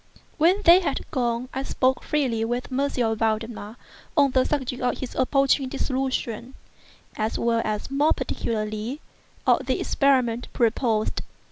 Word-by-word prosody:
When 365 +6 +3
they 345 0 +8
had 310 -7 -2
gone, 240 -1 -1
I 265 - -2
spoke 260 -1 0
freely 255 -7 0
with 240 +3 -3
M. 275 +2 +1
Valdemar 225 -2 -2 0.4
on 280 -2 +5
the 255 0 +3
subject 260 -4 -2
of 250 - 0
his 260 - -6
approaching 275 0 +2
dissolution, 260 -3 -3 0.6
as 215 +1 -1
well 230 -1 +1
as, 215 +4 -3
more 290 +3 +3
particularly, 215 +4 -3 0.5
of - - +3
the - - 0
experiment 250 -4 +1
proposed. 230 -2 +1
250 Hz, 135 wpm, -24 LUFS, 230-275 Hz, 0.6 s, they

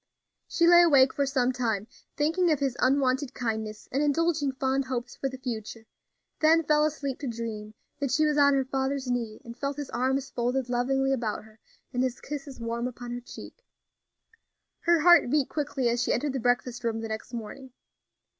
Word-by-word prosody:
She 335 - +2
lay 345 0 +8
awake 275 -6 +5
for 280 -1 0
some 260 -2 +1
time, 225 -5 -1 0.3
thinking 330 +4 +2
of 305 - +3
his 270 -3 -1
unwonted 265 +1 +1
kindness, 220 -3 -4
and 270 - 0
indulging 300 -1 +1
fond 265 +1 -1
hopes 245 -2 -4
for 270 - -2
the 260 - -8
future, 230 -3 -6 0.5
then 325 +1 +4
fell 300 0 +3
asleep 285 -3 -3
to 285 - -4
dream 220 -2 -5 0.2
that 280 - -1
she 305 +4 +2
was 300 -1 +1
on 285 -1 +5
her 270 -1 +1
father's 265 0 -2
knee, 230 -3 -3
and 235 0 -9
felt 275 +2 -3
his 290 -2 -6
arms 260 +2 -1
folded 250 +1 -1
lovingly 270 +2 +1
about 230 -5 -2
her, 220 0 -19 0.3
and 250 - 0
his 255 -1 -1
kisses 280 -2 -7
warm 235 +1 -2
upon 245 -1 -8
her 245 0 -5
cheek. - - -12 1.2
Her 340 -1 +3
heart 345 -5 +6
beat 285 0 +1
quickly 285 -4 -1
as 235 0 +1
she - - 0
entered 280 +2 0
the 265 - -2
breakfast 245 0 0
room 225 -1 -1
the 225 - -4
next 220 +1 -6
morning. 245 +3 -8
260 Hz, 190 wpm, -27 LUFS, 240-285 Hz, 1.2 s, lay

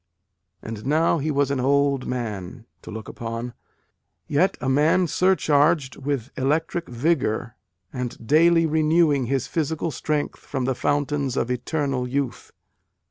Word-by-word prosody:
And 110 -1 -6
now 160 +4 +2
he 150 +3 -2
was 140 -2 +1
an 140 - 0
old 140 0 +2
man, 115 -2 -5 0.2
to - - -11
look 110 0 -7
upon, 115 +1 -5 0.7
yet 175 +7 +2
a 125 - -3
man 150 +7 +3
surcharged 155 -5 +2
with 135 -3 -3
electric 160 +5 -1
vigour 125 -3 0 0.4
and 125 -3 -5
daily 165 +5 +5
renewing 155 -3 +2
his 135 0 0
physical 160 +3 -2
strength 150 0 -2
from 130 -3 -4
the 130 - +1
fountains 145 0 -1
of 125 - 0
eternal 135 0 -1
youth. 135 0 -3
140 Hz, 135 wpm, -24 LUFS, 125-155 Hz, 0.7 s, daily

